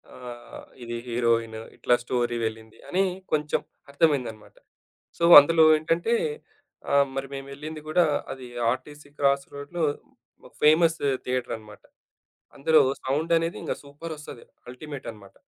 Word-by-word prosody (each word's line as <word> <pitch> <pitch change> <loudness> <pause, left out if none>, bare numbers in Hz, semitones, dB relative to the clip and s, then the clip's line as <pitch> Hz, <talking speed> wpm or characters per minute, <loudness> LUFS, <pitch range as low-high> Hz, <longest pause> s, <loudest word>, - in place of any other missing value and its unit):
ఆహ్, 120 -1 -10 0.2
ఇది 120 0 -5
హీరోయిన్, 115 -2 0 0.2
ఇట్లా 120 - +3
స్టోరీ 120 -1 -1
వెళ్ళింది 110 0 -6
అని 190 +2 +2 0.3
కొంచెం 150 -1 0 0.3
అర్థమైందనమాట. 135 -8 0 0.6
సో, 170 - -2 0.2
అందులో 160 +2 +4
ఏంటంటే 165 +8 0 0.8
ఆహ్, 140 0 +5
మరి 135 0 -3
మేమెళ్ళింది 140 +3 -7
గూడా 175 +3 +3 0.3
అది 130 -2 -8 0.2
ఆర్టీసీ 145 +3 -7
క్రాస్ 140 -1 +2
రోడ్‌లో 145 +4 -5 0.6
ఒక - - -23
ఫేమస్ 165 +2 +5 0.3
థియేటర్ 125 -1 -2
అనమాట. 105 -1 -15 0.7
అందులో 155 +3 +5 0.2
సౌండ్ 150 +6 0
అనేది 165 +1 -2
ఇంగా - - -2
సూపర్ 145 +3 -8
ఒస్తది. 145 -5 -11 0.3
అల్టిమేట్ 140 +2 -9
అనమాట. 100 -3 -16
140 Hz, 125 wpm, -25 LUFS, 120-155 Hz, 0.8 s, ఆహ్